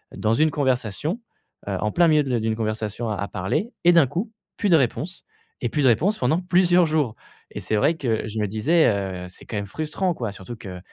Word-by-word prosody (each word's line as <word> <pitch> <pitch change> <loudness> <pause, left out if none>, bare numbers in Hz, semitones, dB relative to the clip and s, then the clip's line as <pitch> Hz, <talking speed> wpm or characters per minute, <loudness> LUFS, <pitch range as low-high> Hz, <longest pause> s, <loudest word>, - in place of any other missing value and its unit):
dans 110 - 0
une 155 +6 +3
conversation, 130 - -1 0.5
heu, 100 - -1
en 105 0 0
plein 170 -1 +4
milieu 150 -1 +4
de 125 -3 0
d'une 110 0 -1
conversation 110 +1 -3
à 100 -1 -2
parler 95 - -2
et 175 - +8
d'un 165 -5 +6
coup, 195 - -3 0.3
plus 205 - 0
de 170 - +7
réponse 155 +6 -2 0.4
et - - 0
plus 150 - -1
de 130 - +5
réponse 185 - +2
pendant 130 +7 +1
plusieurs 180 -1 +4
jours 150 -8 0 0.4
et - - -6
c'est - - -1
vrai 150 +11 +3
que 115 -7 -1
je 110 +1 -4
me 105 - 0
disais, 140 - +3
heu, 95 -3 -2
c'est - - -13
quand 110 - -5
même 100 - -2
frustrant, 155 - -2
quoi, 115 -9 -4
surtout 100 +4 -9
que 95 -5 -8
125 Hz, 220 wpm, -23 LUFS, 105-165 Hz, 0.5 s, et